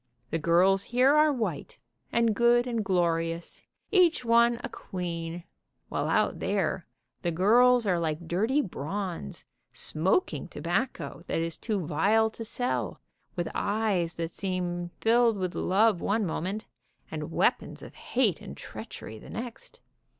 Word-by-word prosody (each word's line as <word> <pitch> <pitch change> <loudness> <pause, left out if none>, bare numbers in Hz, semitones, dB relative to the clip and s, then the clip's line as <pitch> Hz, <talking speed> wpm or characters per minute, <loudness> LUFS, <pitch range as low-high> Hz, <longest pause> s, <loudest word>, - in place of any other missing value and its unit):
The 165 - 0
girls 185 +5 +3
here 255 +4 +4
are 305 0 +5
white, 245 -5 -3 0.3
and 230 -1 +3
good 240 +2 +4
and 230 -3 -1
glorious, 170 -2 -1 0.2
each 350 - +4
one 235 +1 +4
a - - -1
queen, 170 -2 -5 0.5
while - - -1
out - - +1
there - - -1 0.3
the 175 - 0
girls 235 +8 +4
are 180 -4 +2
like 160 0 -2
dirty 220 - +2
bronze, 175 - -5 0.3
smoking 185 - +1
tobacco - - -3
that - - -1
is 165 0 -1
too 205 -7 -2
vile 210 +9 +2
to 225 - -7
sell, 245 +3 -2 0.4
with 175 -2 -2
eyes 200 -5 0
that 165 0 -3
seem 175 -2 -3
filled 230 -1 +4
with 185 -2 -2
love 205 0 +2
one 210 +1 +1
moment, 190 +5 -3 0.5
and - - -5
weapons - - 0
of - - -10
hate 235 -8 0
and 70 - -9
treachery 110 - -8
the - - -13
next. 235 0 -8
195 Hz, 140 wpm, -28 LUFS, 170-235 Hz, 0.5 s, are